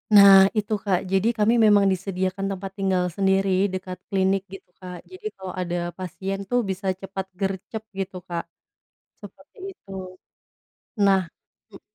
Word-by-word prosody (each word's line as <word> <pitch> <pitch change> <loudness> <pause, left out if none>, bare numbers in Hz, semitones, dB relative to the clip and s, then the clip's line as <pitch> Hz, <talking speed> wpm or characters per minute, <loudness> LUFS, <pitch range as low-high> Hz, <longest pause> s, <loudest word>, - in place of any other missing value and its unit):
Nah 200 -1 +10 0.2
itu, 210 +1 0
Kak. 185 -3 +2
Jadi 195 +3 +2
kami 215 +2 +3
memang 205 -1 +5
disediakan 190 +1 -2
tempat 195 0 -5
tinggal 190 -2 +1
sendiri 195 0 +2 0.2
dekat 185 -1 -5
klinik 195 0 +2
gitu, 195 -1 -11
Kak. 180 -1 -7 0.2
Jadi 370 +3 -12
kalau 190 -1 -7
ada 175 0 -3 0.2
pasien 190 +2 -4
itu 245 - -2
bisa 190 +1 -3
cepat 195 0 -5
gercep 195 +3 -3 0.2
gitu, 190 -1 -4
Kak. 170 -1 -2 0.8
Seperti - - -14 0.2
itu. 195 - -21 1.2
Nah 195 -1 +5 0.5
m 195 - -13
195 Hz, 140 wpm, -24 LUFS, 185-195 Hz, 1.2 s, Nah